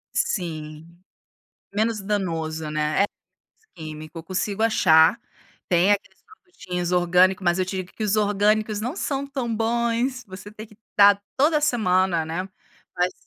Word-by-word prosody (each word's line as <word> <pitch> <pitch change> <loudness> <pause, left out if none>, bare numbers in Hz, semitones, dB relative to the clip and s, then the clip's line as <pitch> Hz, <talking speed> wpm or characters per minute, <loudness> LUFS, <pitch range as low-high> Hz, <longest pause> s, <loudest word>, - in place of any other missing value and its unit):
Sim. 155 -4 -3 0.9
Menos 215 0 0
danoso, 165 -6 -2
né, 155 +5 +1
é - - +4 0.4
menos 440 - -39
químico, 155 0 -9
eu - - -8
consigo 195 +4 -2
achar, 165 -4 +5 0.5
tem 180 +2 +3
aqueles 205 - -3
produtinhos 185 - -6
orgânico, 180 +2 +3
mas 175 0 +1
eu 185 - +1
digo 185 0 -5
que 220 - -6
os 210 0 +1
orgânicos 210 +1 +1
não 245 +8 -3
são 280 -6 -3
tão 255 -5 -3
bons, 235 +3 0
você 190 +2 -10
tem 215 +1 -10
que 210 -1 -20 0.2
dar 200 0 +6 0.2
toda 300 +2 +3
semana, 185 - +2
né. 175 +4 -3 0.5
Mas 180 +1 +1
195 Hz, 145 wpm, -23 LUFS, 175-225 Hz, 0.9 s, dar